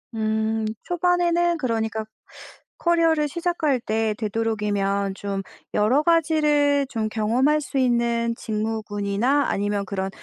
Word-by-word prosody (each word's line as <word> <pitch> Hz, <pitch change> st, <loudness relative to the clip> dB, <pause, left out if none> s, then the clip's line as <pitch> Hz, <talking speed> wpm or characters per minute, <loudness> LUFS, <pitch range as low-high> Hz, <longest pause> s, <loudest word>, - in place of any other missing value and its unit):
음. 220 Hz, 0 st, 0 dB, 0.2 s
초반에는 345 Hz, -1 st, +1 dB
그러니까 220 Hz, -5 st, -2 dB, 0.7 s
"커리어를 330 Hz, -3 st, +2 dB
시작할 330 Hz, -4 st, 0 dB
때 220 Hz, -1 st, -1 dB
되도록이면 205 Hz, -3 st, -1 dB
좀 200 Hz, -1 st, -4 dB, 0.3 s
여러 235 Hz, +8 st, +3 dB
가지를 300 Hz, -4 st, +3 dB
좀 225 Hz, -5 st, -2 dB
경험할 240 Hz, +8 st, +1 dB
수 275 Hz, -1 st, -5 dB
있는 235 Hz, -2 st, +1 dB
직무군이나 215 Hz, +4 st, -1 dB
아니면 205 Hz, 0 st, -1 dB
그런 190 Hz, 0 st, -3 dB
230 Hz, 265 characters per minute, -23 LUFS, 215-300 Hz, 0.7 s, 여러